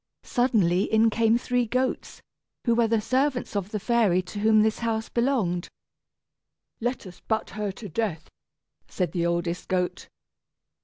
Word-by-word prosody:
Suddenly 205 Hz, -8 st, +2 dB
in 220 Hz, +1 st, +4 dB
came 225 Hz, +1 st, +3 dB
three 245 Hz, 0 st, 0 dB
goats, 255 Hz, +3 st, -2 dB, 0.4 s
who 235 Hz, -, +3 dB
were 230 Hz, 0 st, +3 dB
the 225 Hz, 0 st, +2 dB
servants 255 Hz, +2 st, 0 dB
of 200 Hz, -1 st, -2 dB
the 210 Hz, -, -3 dB
fairy 205 Hz, -5 st, +2 dB
to 195 Hz, +3 st, -7 dB
whom 215 Hz, 0 st, +5 dB
this 220 Hz, 0 st, 0 dB
house 225 Hz, -1 st, -2 dB
belonged. 235 Hz, -9 st, 0 dB, 1.1 s
"Let 240 Hz, 0 st, -2 dB
us 180 Hz, -1 st, -11 dB
butt 220 Hz, -1 st, -2 dB
her 210 Hz, -1 st, -3 dB
to 210 Hz, +2 st, -9 dB
death," 180 Hz, -3 st, -3 dB, 0.6 s
said 180 Hz, -2 st, -2 dB
the 170 Hz, -2 st, 0 dB
oldest 170 Hz, 0 st, -2 dB
goat. 180 Hz, -1 st, -1 dB
220 Hz, 150 wpm, -26 LUFS, 185-235 Hz, 1.1 s, whom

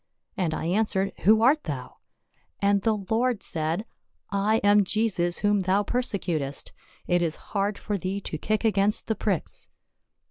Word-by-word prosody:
and 180 Hz, -5 st, 0 dB
I -, -, -4 dB
answered, 195 Hz, +1 st, +1 dB
Who 220 Hz, +2 st, +6 dB
art 290 Hz, +5 st, +4 dB
thou? 135 Hz, -5 st, -5 dB, 0.6 s
And 200 Hz, 0 st, +3 dB
the 220 Hz, +1 st, +2 dB, 0.2 s
Lord 235 Hz, -1 st, +1 dB
said, 165 Hz, +5 st, -2 dB, 0.3 s
* -, -, -48 dB, 0.2 s
I 220 Hz, -, +5 dB
am 205 Hz, 0 st, +6 dB
Jesus 185 Hz, -4 st, 0 dB
whom 205 Hz, -1 st, +3 dB
thou 190 Hz, +2 st, +2 dB
perse 245 Hz, +3 st, -1 dB
cutest; 145 Hz, -7 st, -3 dB, 0.3 s
it 175 Hz, -1 st, +2 dB
is 165 Hz, -2 st, 0 dB, 0.2 s
hard 200 Hz, 0 st, 0 dB
for 205 Hz, -2 st, -3 dB
thee 190 Hz, +2 st, -2 dB
to 155 Hz, -, -5 dB
kick 215 Hz, +5 st, -1 dB
against 210 Hz, -1 st, +2 dB
the 220 Hz, -, 0 dB
pricks.' 195 Hz, -7 st, -2 dB
200 Hz, 165 wpm, -26 LUFS, 175-215 Hz, 0.6 s, Who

